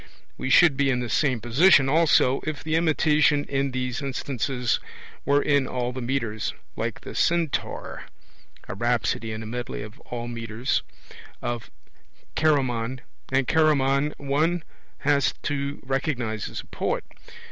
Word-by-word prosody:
We 130 - -4
should 160 -2 +6
be 140 -1 +2
in 125 -2 +1
the 120 -1 -3
same 130 -6 +2
position 135 - +5
also, 145 -3 +4
if 155 -2 -4
the 155 - -2
imitation 155 -2 +3
in 140 -1 -1
these 125 +1 -3
instances 130 -2 -1 0.5
were 140 +1 +3
in 140 -3 +2
all 125 -1 -2
the 130 - -5
metres, 120 -4 -2 0.2
like - - -3
the - - -8
Centaur 170 -3 -1 0.6
(a - - -4
rhapsody 115 +1 0
in 110 +1 -5
a - - -7
medley 120 -1 -5
of 105 0 -11
all 120 -1 -6
metres) 115 0 -2 0.6
of 120 -1 -4 0.7
Chaeremon; 130 -5 +1 0.3
and 130 -1 +2
Chaeremon 145 -2 +3
one 155 +5 0 0.4
has 145 -1 +2
to 140 0 -2
recognize 130 -5 -2
as - - -5
a - - -20
poet. - - -2
135 Hz, 140 wpm, -25 LUFS, 120-145 Hz, 0.7 s, should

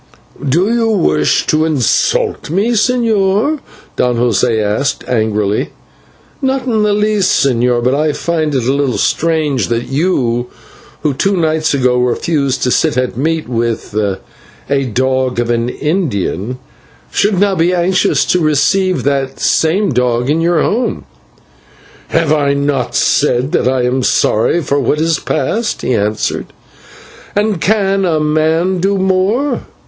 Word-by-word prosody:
"Do 180 - +2
you 230 -1 +1
wish 75 - +1
to 155 0 +1
insult 150 -4 0
me, 200 +8 0
señor?" 230 +2 +1 0.4
Don 125 -1 +1
José 115 -1 +1
asked 110 +5 -1
angrily. 105 -3 0 0.7
"Not 265 -1 -1
in 225 -4 0
the 210 0 +2
least, 210 -6 +2
señor, 120 -2 +1
but 125 +2 +2
I 150 +2 +1
find 155 -1 -2
it 130 - 0
a 130 +3 +1
little 140 -3 0
strange 155 - 0
that 120 +1 -2
you, 130 -6 0 0.6
who 150 - +1
two 195 +8 0
nights 160 -2 +1
ago 125 -2 +2
refused 135 +2 0
to 125 - +1
sit 120 - +1
at 125 -1 -1
meat 160 +5 -1
with 115 -3 -2
'a 110 +6 -4
dog 130 +1 -1
of 120 0 0
an 115 0 0
Indian,' 125 - -2 0.5
should 205 -2 +1
now 200 0 +2
be 175 0 +1
anxious 180 +1 +1
to 180 - +1
receive 175 +5 +1
that 135 -1 -1
same 185 +4 +1
dog 125 +1 0
into 160 +2 +1
your 170 -2 +2
home." 235 +1 -1 1.0
"Have 150 - +1
I 140 -2 +1
not 140 -3 -1
said 130 -2 +1
that - - +1
I 130 -1 +1
am 125 +2 0
sorry 125 +7 +1
for 140 +1 0
what 140 +3 0
is 160 -1 +1
past?" 220 - -2
he 130 - 0
answered, 105 -1 -1 0.9
"and 205 -4 0
can 195 -2 +1
a 165 -4 +1
man 160 +4 +1
do 195 +2 +1
more? 190 +9 0
150 Hz, 145 wpm, -14 LUFS, 125-185 Hz, 1.0 s, Do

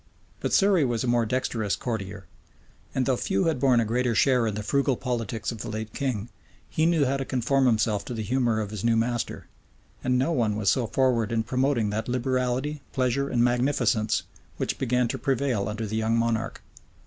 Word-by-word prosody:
But - - -2
Surrey 195 -5 +4
was 120 -4 0
a - - -2
more 120 -1 +2
dexterous 110 -4 -1
courtier; 100 -6 -5 0.7
and 130 - +1
though 130 - +2
few 100 -4 0
had 160 -5 +1
borne 125 -2 +4
a 115 - +2
greater 120 +1 0
share 125 -3 +3
in 105 - -2
the 105 - -4
frugal 140 +1 +1
politics 115 -4 -3
of 115 - -7
the - - -5
late 110 0 -5
king, 120 -5 -2 0.4
he 155 +1 +1
knew 165 -4 +3
how 135 +1 0
to 135 - -2
conform 130 +1 +1
himself 110 -3 +1
to 125 - -5
the 110 - -3
humor 120 -1 +1
of 105 -1 -5
his 105 -3 -5
new 115 -1 +3
master; 120 +1 -2 0.6
and 125 0 +2
no 135 +6 +1
one 115 -9 +1
was 105 -2 +2
so 125 -4 0
forward 120 -3 +1
in 115 -1 +1
promoting 125 -2 +1
that 110 +2 -2
liberality, 130 +3 -1
pleasure, 130 +2 0
and 120 -1 +2
magnificence, 120 -3 +1 0.3
which - - -2
began 125 -1 +1
to - - -4
prevail 130 -7 0
under 110 +1 -3
the 110 +1 -3
young 110 +1 +1
monarch. 115 -1 -1
120 Hz, 200 wpm, -26 LUFS, 110-130 Hz, 0.7 s, Surrey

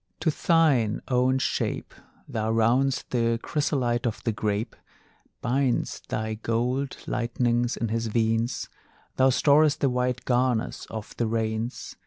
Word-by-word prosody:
To 160 - +2
thine 145 -10 +2
own 130 +1 +3
shape 130 - -2 0.3
Thou 110 0 -2
round'st 120 +4 +2
the 115 -2 +1
chrysolite 125 -5 0
of 115 - -4
the 115 - +1
grape, 105 0 -2 0.7
Bind'st 130 0 0
thy 110 0 -2
gold 125 +5 -1
lightnings 120 0 0
in 115 - -2
his 115 +1 -1
veins; 115 +2 0 0.5
Thou 130 0 +5
storest 145 +3 +4
the 135 - +2
white 125 0 -1
garners 125 -2 0
of 110 -1 -7
the 115 - 0
rains. 110 +1 -3
120 Hz, 130 wpm, -26 LUFS, 115-130 Hz, 0.7 s, Thou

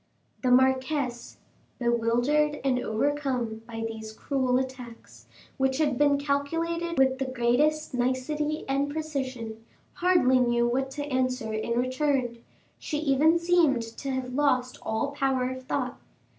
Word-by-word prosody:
The 255 - +1
marquise, 260 0 +1 0.4
bewildered 245 +6 +1
and 260 -2 +2
overcome 250 -2 -1
by 225 -1 -5
these 220 -1 -7
cruel 255 +1 0
attacks, 255 -3 -7 0.3
which 265 -1 +1
had 290 -5 +1
been 285 -1 +4
calculated 330 +4 -1
with 265 0 +3
the 270 - 0
greatest 260 +6 +1
nicety 260 +5 -1
and 275 +1 0
precision, 260 -8 -4 0.3
hardly 345 -8 +3
knew 240 -1 +2
what 265 +2 0
to 290 - -2
answer 255 -5 -1
in 215 +2 -1
return; 255 -1 0 0.4
she 300 - -3
even 305 +2 +3
seemed 335 -8 +3
to 275 - -5
have 260 -1 -3
lost 255 -3 +1
all 250 +6 -2
power 265 -2 0
of 260 0 -8
thought. 255 -1 -2
260 Hz, 130 wpm, -27 LUFS, 245-290 Hz, 0.4 s, been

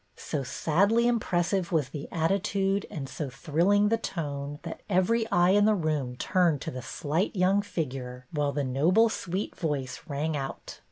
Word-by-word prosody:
" - - -42 0.2
So 150 - 0
sadly 200 - +2
impressive 190 -5 0
was 150 -6 +1
the 145 0 -6
attitude 195 +3 0
and 140 -4 -5
so 145 +1 -5
thrilling 175 +9 +2
the 230 +1 +1
tone, 145 -7 -4
that - - -7
every 220 +5 +2
eye 175 -3 +4
in 205 +1 +5
the 215 0 +4
room 150 -8 -1
turned 175 0 +2
to - - -4
the 130 - -6
slight 150 - -2
young 190 +2 +3
figure, 130 -9 -5
while 145 -3 0
the 145 0 -1
noble, 165 - +3
sweet 190 -1 -3
voice 140 -7 -3
rang 150 +2 -2
out. 135 -2 -6
165 Hz, 170 wpm, -28 LUFS, 140-195 Hz, 0.2 s, in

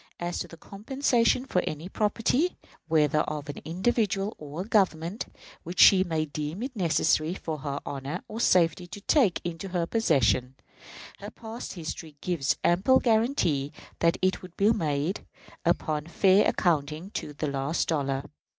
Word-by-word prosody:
As 175 0 -3
to - - -4
compensation 240 - 0
for 180 -8 +1
any 155 +3 -4
property, 225 - 0 0.3
whether 155 -2 +3
of 150 -1 -3
an 145 - -5
individual 195 +3 0
or 150 +3 -6
a 195 - -6
Government, 185 -2 +1 0.3
which 175 +2 -7
she 190 -2 +8
may 160 -4 -1
deem 155 +7 -5
it 260 0 -5
necessary 165 -2 +1
for 160 -5 -5
her 140 0 -3
honor 140 +1 -5
or 220 - -6
safety 180 -4 +3
to 200 +3 -9
take 220 - +3
into 175 +2 -5
her 180 -2 -1
possession, 130 - +1 0.6
her - - -7
past 225 +1 -8
history 160 -2 -7
gives 165 -6 0
ample 195 +10 +4
guarantee 220 - +1 0.3
that 165 0 +3
it 185 0 +1
will 185 -2 -11
be 205 +2 +4
made, 155 -2 -1 0.4
upon 155 0 0
a - - -12
fair 195 +3 +4
accounting, 160 +1 0
to 150 - -5
the 145 - -3
last 140 +2 -1
dollar. 140 -4 0
170 Hz, 155 wpm, -27 LUFS, 150-205 Hz, 0.6 s, she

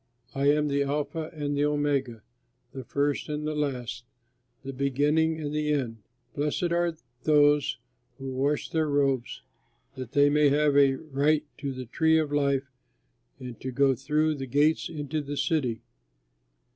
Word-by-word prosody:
I 140 +1 0
am 150 0 +3
the 140 0 0
Alpha 150 +3 -2
and 145 -2 -3
the 145 +1 +2
Omega, 140 -6 -1 0.5
the 130 0 -7
First 140 +5 -1
and 150 0 -3
the 155 - -1
Last, 135 -6 -3 0.6
the 135 - -6
Beginning 145 +4 +1
and 150 -1 -4
the 150 0 0
End. 125 -6 -1 0.4
Blessed 150 +4 -1
are 170 -1 +1 0.3
those 145 -1 +3 0.4
who 135 -1 -6
wash 140 +3 -1
their 160 -2 0
robes, 135 -4 0 0.5
that 130 -3 -8
they 145 0 +5
may 150 0 +4
have 145 0 +2
a 140 -1 +5
right 150 +1 0
to 140 -2 -3
the 130 -1 -6
tree 160 +7 +2
of 155 -2 0
life 140 -1 +1 0.7
and 125 -2 -9
to 130 - -4
go 135 +1 +3
through 150 +5 0
the 135 -3 -6
gates 145 +5 +2
into 155 -1 -3
the 145 0 -6
city. 130 -10 0
145 Hz, 160 wpm, -27 LUFS, 135-150 Hz, 0.7 s, they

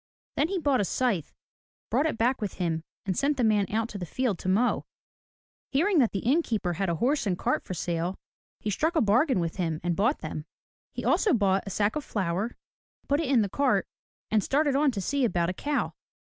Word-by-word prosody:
Then 295 - +2
he 385 +2 -2
bought 285 - +2
a - - +2
scythe, 195 - 0 0.6
brought 305 - +3
it 300 - -2
back 245 +3 +1
with 205 -3 -2
him 165 -3 -1 0.2
and 190 -2 -1
sent 285 +6 +1
the 250 - +1
man 210 -3 +3
out 225 +1 0
to 205 - -6
the 180 - -4
field 230 -3 -1
to 185 - -3
mow. 220 +6 +2 0.9
Hearing 335 +6 +3
that 240 -5 +3
the 195 - -2
inn 285 +8 +4
keeper 210 - -1
had 190 +2 -1
a 170 - +1
horse 255 - +1
and 180 -3 0
cart - - 0
for 185 - -5
sale, 175 +2 -2 0.4
he 210 - -2
struck 320 - 0
a 320 - +4
bargain 240 - +3
with 165 -1 -2
him 165 -4 -1
and 175 -1 0
bought 230 - +1
them. 155 -1 -5 0.5
He - - -5
bought - - +1 0.2
also 320 -11 +4 0.3
a - - -7
sack 205 +2 0
of 300 - -2
flour, 200 +2 -2 0.5
put 285 +1 +2
it 315 -5 -1
in 250 -5 +4
the - - -1
cart 275 +7 +1 0.4
and 215 -2 +3
started 285 0 +2
on 290 +1 +4
to 215 -7 -2
see 280 +7 0
about 175 -6 +1
a - - -6
cow. 290 +9 -1
220 Hz, 225 wpm, -27 LUFS, 185-275 Hz, 0.9 s, inn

